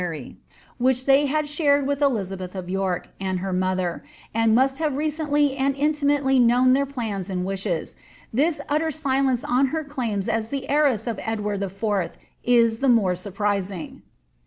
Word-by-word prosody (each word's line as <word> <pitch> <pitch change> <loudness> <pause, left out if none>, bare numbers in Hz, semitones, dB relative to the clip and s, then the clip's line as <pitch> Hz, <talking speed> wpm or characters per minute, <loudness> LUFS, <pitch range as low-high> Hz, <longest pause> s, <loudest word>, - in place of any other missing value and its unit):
31 180 - -1
foary, 145 - -10 0.4
which 255 +1 +2
they 275 +1 +4
had 305 +2 0
shared 285 -2 +2
with 285 +1 -1
Elizabeth 195 -9 -1
of 185 -2 -5
York 190 -2 -2
and 190 -1 -2
her 190 +1 -3
mother, 185 -1 -1 0.3
ind 225 0 +3
must 265 +3 +2
have 310 -3 0
recendy 295 -2 +1
and 275 0 +1
intimately 285 -2 +2
known 250 +1 +5
their 280 +1 +2
plans 220 -8 -4
and 180 -1 -2
wishes, 190 -4 -3 0.4
this 300 +7 +1
utter 310 +2 +1
sOence 270 -4 0
on 255 +3 +3
her 315 +4 -2
claims 235 -8 -3
as 225 0 -1
the 275 0 -4
heiress 280 -7 +2
of 230 -4 -3
Edward 210 -2 -2
IV. 200 -1 -2 0.3
is 230 -2 +3
the 275 - +2
more 215 -7 +4
nirprising. 195 -1 -3
240 Hz, 165 wpm, -23 LUFS, 195-280 Hz, 0.4 s, known